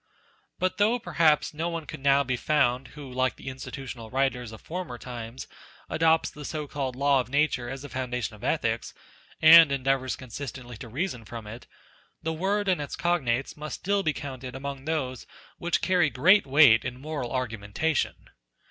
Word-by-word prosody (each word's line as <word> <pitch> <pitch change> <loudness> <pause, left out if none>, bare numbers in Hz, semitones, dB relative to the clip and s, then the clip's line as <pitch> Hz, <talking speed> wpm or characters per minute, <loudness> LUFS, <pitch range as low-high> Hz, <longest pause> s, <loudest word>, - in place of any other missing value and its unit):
But 185 0 -1
though 220 +4 +4
perhaps 165 -6 +2
no 165 +3 -2
one 165 -2 -4
could - - -8
now 140 +1 +4
be 130 -1 -1
found 130 -2 +1
who 140 -3 -8
like 130 0 +1
the - - -7
institutional 130 -3 -7
writers 130 -3 -1
of 110 - -10
former 170 -8 -6
times, 120 0 -7 0.5
adopts 160 0 +3
the 150 - -10
so 150 +1 -4
called 135 -3 -4
Law 140 0 +3
of 125 - -3
Nature 140 -3 +1
as 135 +1 -6
the 145 - -8
foundation 125 -4 -3
of 105 - -16
ethics, - - -1 0.5
and 160 -1 +10
endeavours 135 -2 0
consistently 125 -1 -8
to 120 - -9
reason 130 - -3
from 115 0 -8
it, 115 +3 -9 0.6
the 160 - -1
word 200 +5 0
and 180 -5 +2
its 145 - -5
cognates 135 -8 0
must 150 0 -6
still 200 +1 0
be 155 - +1
counted 130 -3 -7
among 135 0 -6
those 135 -6 -2 0.3
which 175 0 0
carry 180 -5 +3
great 180 +8 +4
weight 135 -5 +6
in 125 0 -5
moral 145 -4 -4
argumenta 125 +4 -2
tion. - - -2
135 Hz, 175 wpm, -27 LUFS, 125-155 Hz, 0.6 s, and